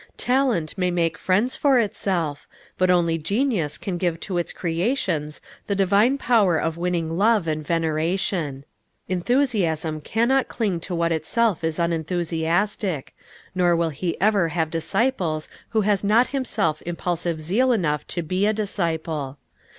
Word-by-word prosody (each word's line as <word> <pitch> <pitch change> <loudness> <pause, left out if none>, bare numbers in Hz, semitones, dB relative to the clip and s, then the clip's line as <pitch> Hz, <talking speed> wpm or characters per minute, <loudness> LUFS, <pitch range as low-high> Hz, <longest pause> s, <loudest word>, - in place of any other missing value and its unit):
Talent 245 - +1
may 180 -1 +2
make 170 -2 0
friends 210 +8 +1
for 275 -3 +3
itself, 180 -9 -1 0.3
but 185 0 +2
only 170 -2 +3
genius 200 - 0
can 180 -3 -4
give 170 -2 -1
to 180 -3 -2
its 170 - -3
creations 170 - -1 0.3
the 200 - 0
divine 200 +7 +3
power 215 -10 +3
of 165 0 -1
winning 170 -2 -1
love 210 -4 +3
and 155 -1 -1
veneration. 160 -2 -1 0.4
Enthusiasm 180 - 0
cannot 240 - +1
cling 200 -7 -1
to 175 +1 -5
what 170 0 +1
itself 175 +4 0
is 160 -1 -1
unenthusiastic, 170 +1 -1 0.4
nor 175 -2 +3
will 165 -1 +1
he 170 +4 -3
ever 200 -3 +3
have 160 -1 -1
disciples 170 -2 0 0.2
who 220 - +1
has 205 -1 +1
not 220 +5 +4
himself 215 - 0
impulsive 175 -1 -2
zeal 210 +12 +2
enough 155 -10 0
to 175 - -3
be 185 +5 0
a 215 - +2
disciple. 160 -9 -2
175 Hz, 145 wpm, -23 LUFS, 160-210 Hz, 0.4 s, not